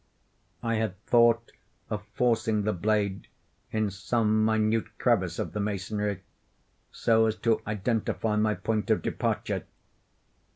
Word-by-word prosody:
I 115 -1 0
had 105 -4 -2
thought 115 -1 +4 0.4
of - - -2
forcing 115 -3 +2
the 105 +1 +1
blade 100 +1 0 0.4
in 110 -2 0
some 110 +2 +1
minute 110 0 +1
crevice 95 -9 +1
of - - -3
the 105 - -2
masonry, 100 -1 -2 0.7
so 110 -1 +3
as 110 - 0
to 115 -1 +3
identify 110 +1 -1
my 105 0 +2
point 105 +3 -2
of - - +2
departure. - - -1
110 Hz, 125 wpm, -28 LUFS, 105-115 Hz, 0.7 s, thought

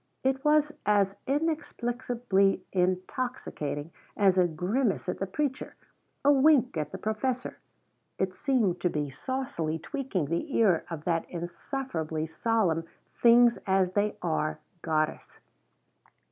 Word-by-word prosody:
It 265 +1 +1
was 300 0 +4
as 200 -2 +2
inexplicably 245 - 0
intoxicating 180 - -2 0.3
as 190 -3 +4
a 180 - +5
grimace 190 - -1
at 180 - -2
the 195 - -2
preacher 275 +6 -3 0.5
a 285 - +7
wink 275 - +4
at 150 -2 -2
the - - -5
professor. 240 +4 -2 0.6
It 190 -1 -1
seemed 205 -8 +1
to 180 - +2
be 145 -3 -2
saucily 170 - -3
tweaking 250 - -3
the 170 - -2
ear 195 -8 +3
of 165 -3 -6
that 165 0 -1
insufferably 170 - -4
solemn 165 -1 0 0.3
Things 240 0 +5
as 190 -1 +3
They 205 +2 0
Are 155 -2 0 0.2
goddess. 155 -1 -2
195 Hz, 120 wpm, -28 LUFS, 170-255 Hz, 0.6 s, a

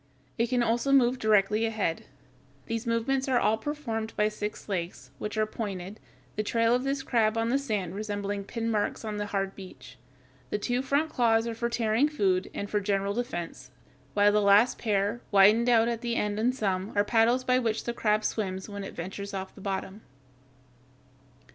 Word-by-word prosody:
It 230 0 +2
can 245 -1 +2
also 235 +4 +1
move 255 -2 +4
directly 215 -1 +3
ahead. 220 -7 -1 0.6
These 230 0 -4
movements 255 +4 0
are 260 -2 +2
all 220 -2 +3
performed 230 -6 -4
by 210 0 +3
six 210 0 -6
legs, 170 -9 -4
which 210 +1 -4
are 215 - +3
pointed, 205 -2 -6 0.4
the 215 - 0
trail 230 +2 +2
of 250 +1 +1
this 275 0 -1
crab 225 -3 +1
on 225 0 0
the 270 +3 +2
sand 210 -10 -2
resembling 205 -1 -3
pin 230 +1 -3
marks 210 +1 -1
on 210 -1 -3
the 205 0 -3
hard 195 -1 -2
beach. 180 -10 -12 0.5
The - - -1
two 245 +4 -1
front 285 +4 0
claws 225 -2 +2
are 230 - -3
for 235 +1 -2
tearing 235 +4 +2
food 190 -10 0
and 200 - -4
for 210 - 0
general 200 0 0
defense, 175 - -5 0.5
while 205 0 +5
the 210 0 +3
last 205 +4 +4
pair, 205 +1 0
widened 210 +4 +5
out 230 -1 +5
at 235 -1 -2
the 235 -1 -2
end 210 -1 -1
in 235 +3 +3
some, 195 -5 -2
are 205 0 +3
paddles 235 +3 +3
by 255 0 +3
which 225 -3 -1
the 235 - -3
crab 215 -2 +1
swims 190 -4 -2
when 200 -1 -6
it - - -8
ventures 200 +3 -6
off 190 0 -5
the - - -14
bottom. 195 +1 -4
215 Hz, 190 wpm, -28 LUFS, 200-235 Hz, 0.6 s, while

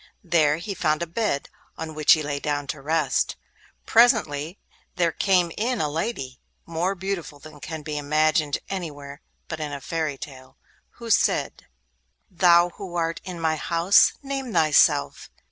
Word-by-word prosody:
There 155 -4 +2
he 185 +5 -5
found 155 -2 0
a - - -2
bed, 170 -4 -2 0.3
on 160 -1 -6
which 155 -1 +5
he 155 - 0
lay 145 -1 -3
down 145 -1 -2
to 145 - -14
rest. 150 -2 0 0.5
Presently 190 - +3 0.4
there 170 -2 +1
came 180 -3 +2
in 240 +2 -1
a 155 - +1
lady, 145 - -4 0.3
more 170 +4 -1
beautiful 190 -5 -5
than 150 +1 -13
can 155 +3 -7
be 150 -1 -4
imagined 155 0 +1
anywhere 145 -6 -7 0.3
but 160 - -6
in 150 -1 -4
a 140 - -5
fairy 155 0 -3
tale, 130 -3 -11 0.4
who 235 -1 -6
said: - - +1 0.6
'Thou 175 -1 +5
who 185 -3 -8
art 165 -1 -1
in 180 -3 -7
my 160 -1 0
house, 170 +4 +4
name 270 -3 -4
thyself! 150 - +3
160 Hz, 155 wpm, -24 LUFS, 145-180 Hz, 0.6 s, which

